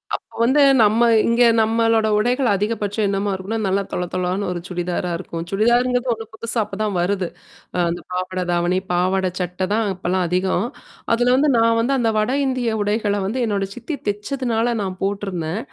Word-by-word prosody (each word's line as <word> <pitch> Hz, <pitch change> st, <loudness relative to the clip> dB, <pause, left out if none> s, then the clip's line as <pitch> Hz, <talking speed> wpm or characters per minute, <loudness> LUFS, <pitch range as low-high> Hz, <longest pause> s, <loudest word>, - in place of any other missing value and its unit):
அப்ப -, -, -10 dB
வந்து 270 Hz, +5 st, +4 dB, 0.2 s
நம்ம 220 Hz, +3 st, +4 dB, 0.2 s
இங்க 235 Hz, +1 st, +3 dB, 0.2 s
நம்மளோட 225 Hz, 0 st, +2 dB
உடைகள் 245 Hz, +3 st, +1 dB
அதிகபட்சம் 210 Hz, +1 st, -1 dB
என்னமா 200 Hz, +1 st, -1 dB
இருக்கும்னா, 190 Hz, +4 st, -3 dB
நல்லா 195 Hz, +1 st, +1 dB
தொள 180 Hz, -, -2 dB
தொளனு 185 Hz, +2 st, -1 dB
ஒரு 175 Hz, -, -3 dB
சுடிதாரா 180 Hz, 0 st, -3 dB
இருக்கும். 170 Hz, -2 st, -6 dB
சுடிதாருங்கிறது 245 Hz, +4 st, +2 dB
ஒண்ணும் 225 Hz, -1 st, -8 dB
புதுசா 230 Hz, +1 st, -3 dB
அப்ப 200 Hz, -1 st, -8 dB
தான் 210 Hz, -3 st, -1 dB
வருது. 185 Hz, 0 st, 0 dB, 0.5 s
அ -, -, 0 dB
அந்த 170 Hz, -, -4 dB
பாவாடை 185 Hz, 0 st, -2 dB
தாவணி, 175 Hz, +1 st, +1 dB
பாவாடை 185 Hz, +1 st, +1 dB
சட்ட 180 Hz, +1 st, -4 dB
தான் 225 Hz, 0 st, +1 dB
அப்பலாம் 180 Hz, 0 st, -1 dB
அதிகம். 185 Hz, +3 st, 0 dB, 0.5 s
அதுல 245 Hz, +2 st, +3 dB
வந்து 290 Hz, +2 st, +3 dB
நான் 230 Hz, 0 st, +3 dB
வந்து 250 Hz, +4 st, +1 dB
அந்த 230 Hz, -2 st, +1 dB
வட 215 Hz, +4 st, 0 dB
இந்திய 245 Hz, -4 st, -1 dB
உடைகள்ல 205 Hz, 0 st, 0 dB
வந்து 245 Hz, +6 st, -2 dB
என்னோட 200 Hz, -2 st, 0 dB
சித்தி 280 Hz, +5 st, -5 dB
தெச்சதுனால 230 Hz, +2 st, -1 dB
நான் 185 Hz, -1 st, -4 dB
போட்டுருந்தேன். 195 Hz, -2 st, -2 dB
205 Hz, 170 wpm, -21 LUFS, 185-230 Hz, 0.5 s, வந்து